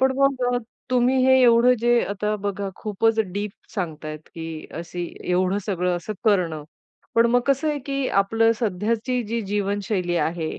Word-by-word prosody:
पण 265 Hz, 0 st, +4 dB
मग 275 Hz, -2 st, +2 dB
अ, -, -, +2 dB, 0.3 s
तुम्ही 250 Hz, +1 st, +3 dB
हे 260 Hz, 0 st, +6 dB
एवढं 240 Hz, +1 st, +6 dB
जे 240 Hz, 0 st, +4 dB
आता 210 Hz, +1 st, -1 dB
बघा 200 Hz, 0 st, -2 dB
खूपच 220 Hz, +2 st, 0 dB
डिप 205 Hz, +2 st, -3 dB, 0.2 s
सांगतायेत 155 Hz, -5 st, -4 dB
की 160 Hz, -1 st, -6 dB
अशी 175 Hz, +2 st, -5 dB, 0.2 s
एवढं 185 Hz, +2 st, +1 dB
सगळं 180 Hz, -3 st, 0 dB
असं 195 Hz, +5 st, -5 dB
करणं. 175 Hz, -8 st, +1 dB, 0.5 s
पण 230 Hz, 0 st, +5 dB
मग 245 Hz, -, +4 dB
कसं 275 Hz, +3 st, +2 dB
आहे 295 Hz, -, 0 dB
की 275 Hz, -1 st, -1 dB
आपली 225 Hz, +3 st, +3 dB
सध्याची 230 Hz, +4 st, -1 dB
जी 230 Hz, +2 st, -2 dB
जीवनशैली 200 Hz, -2 st, -1 dB
आहे. 165 Hz, -1 st, -2 dB
210 Hz, 160 wpm, -23 LUFS, 180-240 Hz, 0.5 s, हे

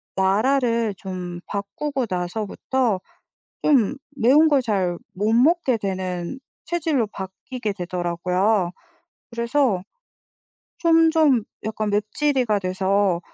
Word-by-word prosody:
나라를 230 Hz, +3 st, +2 dB
좀 180 Hz, -2 st, -6 dB
바꾸고 245 Hz, +7 st, -3 dB
나서부터 205 Hz, +5 st, -1 dB, 0.6 s
좀 270 Hz, -5 st, +3 dB, 0.2 s
매운 280 Hz, +6 st, +5 dB
걸 285 Hz, -3 st, +4 dB
잘 190 Hz, -7 st, 0 dB, 0.2 s
못 210 Hz, +4 st, 0 dB
먹게 265 Hz, +1 st, +3 dB
되는 185 Hz, +2 st, -3 dB, 0.3 s
체질로 315 Hz, -8 st, 0 dB
바뀌게 205 Hz, +4 st, -5 dB
되더라고요. 180 Hz, +1 st, 0 dB, 0.6 s
그래서 235 Hz, -3 st, +1 dB, 1.0 s
좀, 330 Hz, -1 st, +4 dB
좀 295 Hz, -8 st, +4 dB, 0.2 s
약간 215 Hz, -1 st, -2 dB
맵찔이가 215 Hz, +2 st, +1 dB
돼서 190 Hz, 0 st, +1 dB
215 Hz, 200 characters per minute, -23 LUFS, 190-265 Hz, 1.0 s, 매운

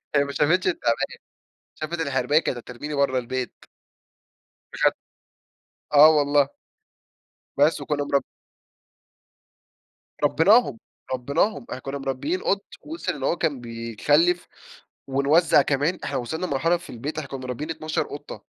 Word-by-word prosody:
هي 140 Hz, -, +5 dB
ما 140 Hz, -, -5 dB
شافتش 175 Hz, +7 st, +2 dB
التِعبان. 120 Hz, -10 st, 0 dB, 0.6 s
شافت 165 Hz, +2 st, -4 dB
الحرباية، 140 Hz, 0 st, +2 dB
كانت 130 Hz, -, -2 dB
هترميني 125 Hz, +5 st, -7 dB
بره 140 Hz, -2 st, +1 dB
البيت. 125 Hz, 0 st, -4 dB, 1.2 s
بجد، -, -, +3 dB, 1.0 s
آه 150 Hz, +1 st, +9 dB
والله. 145 Hz, -2 st, +3 dB, 1.1 s
بس 145 Hz, +2 st, +4 dB
وكنا 145 Hz, -1 st, -1 dB
مرب 140 Hz, -1 st, +1 dB, 2.0 s
ربيناهم، 210 Hz, +11 st, +4 dB, 0.4 s
ربيناهم، 140 Hz, -, 0 dB
إحنا 130 Hz, -, -5 dB
كنا 135 Hz, +2 st, -5 dB
مربيين 135 Hz, +6 st, -2 dB
قط، 200 Hz, +1 st, 0 dB, 0.2 s
وصل 320 Hz, +3 st, -4 dB
إن 145 Hz, -, -9 dB
هو 140 Hz, -, +1 dB
كان 145 Hz, -6 st, -1 dB
بيخلف 120 Hz, +9 st, +1 dB, 0.6 s
ونوزع 145 Hz, +3 st, +4 dB
كمان. 145 Hz, +6 st, 0 dB
إحنا -, -, -3 dB
وصلنا 160 Hz, +9 st, -3 dB
لمرحلة 165 Hz, +3 st, +1 dB
في 175 Hz, -, -12 dB
البيت، 140 Hz, +7 st, -5 dB
إحنا 145 Hz, -3 st, -5 dB
كُنَا 135 Hz, -, -5 dB
مربيين 130 Hz, +5 st, -5 dB
12 155 Hz, -1 st, -2 dB
قطة. 145 Hz, -, -9 dB
145 Hz, 125 wpm, -24 LUFS, 135-160 Hz, 2.0 s, آه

